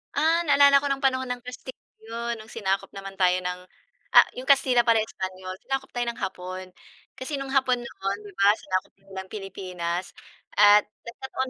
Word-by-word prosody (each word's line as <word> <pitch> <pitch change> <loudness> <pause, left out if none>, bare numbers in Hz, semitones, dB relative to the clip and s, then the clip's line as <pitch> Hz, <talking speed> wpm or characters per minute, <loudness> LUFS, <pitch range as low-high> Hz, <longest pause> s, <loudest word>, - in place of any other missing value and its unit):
Ah, 325 +2 +3
naalala 280 -1 +6
ko 285 - -2
no'ng 275 0 -2
panahon 260 -1 +1
ng 245 0 -3
Kastil 250 +1 -8 0.3
'yon, 230 +1 -4
no'ng 215 0 -12
sinakop 195 -3 -2
naman 195 0 -7
tayo 185 -1 +3
ng, 180 0 -4 0.6
ah, - - +9
'yong 255 +2 -8
Kastila 265 -3 +5
pala, 230 -1 +3
Espanyol. 185 -2 -6
Sinakop 270 0 -4
tayo 245 0 -1
ng 235 - -6
Hapon, 185 0 -5 0.5
kasi 270 +3 -5
no'ng 275 -1 -5
Hapon 260 -2 +3
noon, 200 -5 -4
'di 205 - -10
ba, 200 +2 +3
sinakop 185 -1 -3
nila 195 -1 -14
ang 190 - -15
Pilipinas 185 -3 -4 0.5
at 205 0 +7 0.2
nagkataon 260 +2 -5
225 Hz, 180 wpm, -25 LUFS, 190-260 Hz, 0.6 s, ah